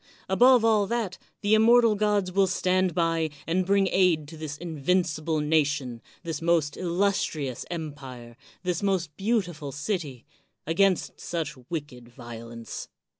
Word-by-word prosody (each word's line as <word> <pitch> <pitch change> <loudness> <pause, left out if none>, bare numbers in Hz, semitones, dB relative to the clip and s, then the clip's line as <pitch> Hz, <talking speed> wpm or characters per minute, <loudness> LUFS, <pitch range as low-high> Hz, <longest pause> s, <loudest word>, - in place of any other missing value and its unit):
Above 245 +4 +5
all 215 -3 +3
that, 225 -5 -2 0.2
the 205 +1 +2
immortal 230 +1 +6
gods 205 -2 +1
will 195 +1 +3
stand 185 -1 +1
by 165 -2 +1 0.2
and 180 +2 0
bring 200 0 +3
aid 170 -6 +3
to 160 - -10
this 155 -2 -6
invin 170 +2 0
cible 155 -1 -2
nation, 145 -6 0 0.2
this 165 -3 -4
most 165 -3 +1
illustrious 175 -7 -1
empire, 135 -8 -7 0.3
this 180 -2 -1
most 185 -6 -1
beautiful 180 -9 -1
city, 145 - -4 0.4
against 185 +3 +1
such 160 -3 -3
wicked 145 -7 -6
violence. 115 -1 -8
170 Hz, 130 wpm, -26 LUFS, 145-195 Hz, 0.4 s, immortal